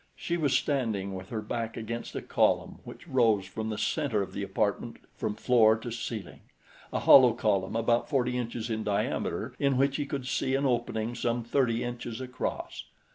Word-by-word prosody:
She 170 Hz, -, -2 dB
was 145 Hz, -6 st, +2 dB
standing 110 Hz, -10 st, -1 dB
with 95 Hz, 0 st, -7 dB
her 110 Hz, -2 st, -4 dB
back 115 Hz, +1 st, -4 dB
against 115 Hz, +1 st, -5 dB
a -, -, -4 dB
column -, -, +1 dB
which -, -, -11 dB
rose 115 Hz, -7 st, +3 dB
from 110 Hz, +4 st, -5 dB
the 110 Hz, -, -3 dB
center 130 Hz, -10 st, 0 dB
of -, -, -9 dB
the -, -, -4 dB
apartment -, -, -1 dB, 0.2 s
from 105 Hz, -, -2 dB
floor 110 Hz, -3 st, +5 dB
to 120 Hz, +1 st, -7 dB
ceiling 115 Hz, -4 st, -5 dB, 0.5 s
a -, -, -1 dB
hollow 125 Hz, -3 st, +8 dB
column 100 Hz, -4 st, 0 dB
about 115 Hz, +1 st, +1 dB
forty 125 Hz, -4 st, +1 dB
inches 120 Hz, -1 st, -3 dB
in 110 Hz, 0 st, -2 dB
diameter 105 Hz, -1 st, -1 dB
in 140 Hz, -2 st, +2 dB
which 135 Hz, +1 st, +2 dB
he 145 Hz, -2 st, -2 dB
could 140 Hz, -3 st, -4 dB
see 130 Hz, +1 st, 0 dB
an 140 Hz, +1 st, 0 dB
opening 120 Hz, -2 st, 0 dB
some 120 Hz, 0 st, -1 dB
thirty 120 Hz, -1 st, +1 dB
inches 120 Hz, -1 st, -5 dB
across. 130 Hz, 0 st, -4 dB
120 Hz, 185 wpm, -29 LUFS, 110-130 Hz, 0.5 s, hollow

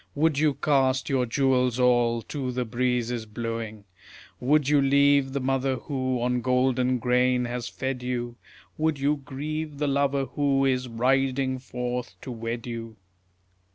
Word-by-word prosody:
Would 150 Hz, -1 st, +2 dB
you 150 Hz, -2 st, +2 dB
cast 135 Hz, -2 st, +1 dB
your 130 Hz, -3 st, +1 dB
jewels 125 Hz, -1 st, +1 dB
all 120 Hz, -2 st, +3 dB
to 135 Hz, -1 st, -4 dB
the 125 Hz, 0 st, -2 dB
breezes 120 Hz, -1 st, -1 dB
blowing? 115 Hz, -1 st, -5 dB, 0.6 s
Would 145 Hz, +2 st, +2 dB
you 145 Hz, -1 st, +4 dB
leave 140 Hz, 0 st, +4 dB
the 140 Hz, -, -1 dB
mother 135 Hz, 0 st, 0 dB
who 130 Hz, -1 st, -2 dB
on 125 Hz, 0 st, 0 dB
golden 125 Hz, 0 st, +2 dB
grain 125 Hz, +1 st, +2 dB
has 120 Hz, 0 st, -4 dB
fed 130 Hz, 0 st, -4 dB
you? 120 Hz, -1 st, -3 dB, 0.4 s
Would 155 Hz, -2 st, +1 dB
you 145 Hz, +2 st, +1 dB
grieve 145 Hz, +3 st, -5 dB
the 150 Hz, -, -1 dB
lover 140 Hz, 0 st, +1 dB
who 135 Hz, +1 st, +1 dB
is 130 Hz, -1 st, +1 dB
riding 130 Hz, +2 st, +1 dB
forth 125 Hz, -1 st, -5 dB
to 130 Hz, -, -7 dB
wed 115 Hz, 0 st, -4 dB
you? 115 Hz, -2 st, -6 dB
130 Hz, 150 wpm, -26 LUFS, 125-140 Hz, 0.6 s, you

